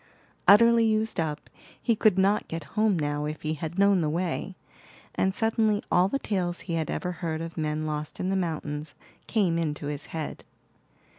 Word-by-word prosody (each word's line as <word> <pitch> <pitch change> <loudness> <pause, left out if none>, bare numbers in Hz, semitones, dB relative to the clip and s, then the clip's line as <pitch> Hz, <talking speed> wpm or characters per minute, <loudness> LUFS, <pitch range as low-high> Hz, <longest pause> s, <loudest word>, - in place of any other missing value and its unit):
Utterly 230 +3 +7
used 220 -2 +1
up, 155 -2 -2 0.3
he 230 - +1
could 210 -3 +3
not 195 +2 +2
get 165 0 -5
home 215 -3 +2
now 145 -1 -1
if 155 +1 -5
he 155 0 -1
had 160 +3 -5
known 200 -2 +4
the 155 - 0
way; 175 +3 -2 0.6
and 190 - +1
suddenly 220 0 +1
all 180 +1 +5
the 240 - -1
tales 180 -8 -2
he 170 - -5
had 160 -1 -1
ever 180 - -2
heard 165 -2 -3
of 165 0 -6
men 155 -1 -2
lost 150 -1 -4
in 185 - -1
the 195 - +1
mountains 155 -5 -3 0.3
came 185 -7 +1
into 150 -2 -2
his 145 0 -4
head. 160 -2 -5
175 Hz, 180 wpm, -27 LUFS, 155-200 Hz, 0.6 s, Utterly